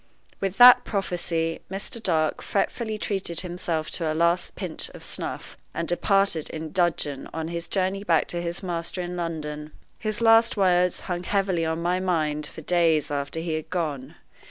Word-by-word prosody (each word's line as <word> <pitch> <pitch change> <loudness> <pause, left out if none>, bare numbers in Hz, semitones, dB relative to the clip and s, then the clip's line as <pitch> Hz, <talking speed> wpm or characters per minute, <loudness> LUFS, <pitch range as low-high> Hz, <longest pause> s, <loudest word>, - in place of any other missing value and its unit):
With 195 0 -2
that 245 0 +9
prophecy, 170 -5 -2
Mr. 195 +4 -2
Dark 160 -6 +1
fretfully 220 +2 -1
treated 195 -5 -1
himself 170 -3 -3
to 165 -3 -1
a - - -2
last 170 +2 +1
pinch 180 -5 -5
of - - -10
snuff, - - -4 0.2
and 170 - -2
departed 195 -2 +2
in 155 -1 -6
dudgeon 165 -6 0
on 160 0 -3
his 170 0 -4
journey 195 +1 0
back 165 -6 +2
to 175 - 0
his 175 +3 -3
master 175 0 -3
in 175 0 -5
London. 155 -3 -5 0.3
His 215 -1 -2
last 225 0 +5
words 180 -2 +3
hung 175 -2 -3
heavily 185 -2 0
on 160 +1 -2
my 180 +1 +1
mind 155 -5 0
for 160 - -10
days 165 -3 +2
after 145 +3 -2
he 165 -1 -3
had 155 -1 -4
gone. 155 -7 -3
175 Hz, 170 wpm, -25 LUFS, 160-190 Hz, 0.3 s, that